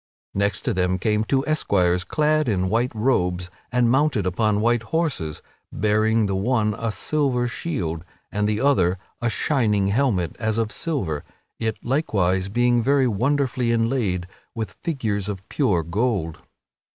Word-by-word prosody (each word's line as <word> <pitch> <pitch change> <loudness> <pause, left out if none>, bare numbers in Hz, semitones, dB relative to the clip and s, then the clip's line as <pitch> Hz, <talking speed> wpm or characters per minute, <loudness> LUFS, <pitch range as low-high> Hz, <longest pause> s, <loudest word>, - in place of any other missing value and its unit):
Next 100 -1 -1
to - - 0
them 90 0 +1
came 105 +3 +1
two 135 +4 0
esquires, 90 - +2
clad 155 - +1
in 95 -3 0
white 120 +4 +1
robes 90 -6 0 0.2
and 125 -1 +3
mounted 135 -7 +2
upon 105 +3 +1
white 120 +1 +2
horses, 110 - -2 0.3
bearing 110 +2 +2
the 100 -1 -1
one 105 +1 +1
a 115 -1 -1
silver 130 -1 0
shield 90 - -3 0.3
and 105 +1 0
the 105 0 0
other 95 -10 +3 0.2
a 120 - +1
shining 105 -4 +1
helmet, 105 -7 +1
as 110 -1 0
of 110 -2 0
silver 95 - -2 0.4
it 110 -1 -1
likewise 100 - +1
being 120 +2 +2
very 135 +1 +3
wonderfully 125 +1 0
inlaid 115 -6 0 0.3
with 110 -5 -3
figures 105 - -3
of 95 0 -6
pure 100 - +1
gold. 90 -2 -1
110 Hz, 145 wpm, -23 LUFS, 95-125 Hz, 0.4 s, and